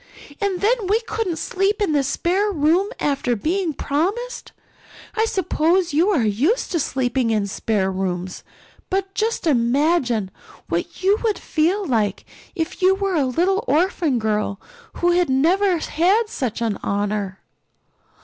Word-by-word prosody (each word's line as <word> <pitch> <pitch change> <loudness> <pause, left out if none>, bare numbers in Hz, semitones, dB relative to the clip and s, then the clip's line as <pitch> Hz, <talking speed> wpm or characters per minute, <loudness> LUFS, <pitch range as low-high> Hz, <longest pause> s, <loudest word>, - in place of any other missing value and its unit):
And 395 -3 -1
then 440 -1 +1
we 420 +4 +3
couldn't 445 -6 -2
sleep 390 +5 0
in 410 -6 +1
the 290 -2 +3
spare 365 +9 0
room 340 +4 +2
after 275 -4 0
being 335 - -1
promised. 380 - -2 0.6
I 445 0 +1
suppose 360 -3 +1
you 335 +7 +3
are 320 - +2
used 255 - +1
to 340 - +1
sleeping 255 -3 0
in 215 -2 +1
spare 200 -1 -1
rooms. 185 -1 -3 0.5
But 385 0 -1
just 440 0 -1
imagine 245 - +2 0.4
what 170 - -3
you 400 +3 +3
would 435 -3 +1
feel 355 +6 0
like 215 - 0 0.3
if 325 0 -4
you 375 +1 +5
were 390 -1 -1
a 290 -6 +2
little 370 - +1
orphan 320 -3 +1
girl 210 -2 -1 0.3
who 350 0 +1
had 350 -2 +2
never 350 +8 +3
had 370 +8 +1
such 245 - -3
an 220 -3 -1
honor." 200 -1 -2
325 Hz, 145 wpm, -21 LUFS, 240-390 Hz, 0.6 s, you